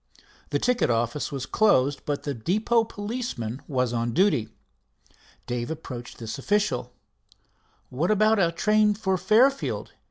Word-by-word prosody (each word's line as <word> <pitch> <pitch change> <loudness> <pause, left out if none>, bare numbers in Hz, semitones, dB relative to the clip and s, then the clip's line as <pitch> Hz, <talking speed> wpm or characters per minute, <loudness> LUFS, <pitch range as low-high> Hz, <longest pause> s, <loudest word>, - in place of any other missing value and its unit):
The - - +1
ticket 250 - +1
office 120 +6 -1
was 135 -2 -4
closed, 145 -10 +2
but 145 -1 -2
the 145 - -2
depot 215 - +1
policeman 205 - -5
was 125 -3 0
on 115 0 -1
duty. 170 - +2 1.0
Dave 120 -1 -3
approached 130 -7 -7
this 115 +2 -6
official. 180 -8 0 1.0
"What 150 +8 -1
about 215 +1 +3
a 170 -3 +3
train 210 +4 +2
for 195 -2 0
Fairfield?" 225 +9 +2
165 Hz, 130 wpm, -25 LUFS, -, 1.0 s, about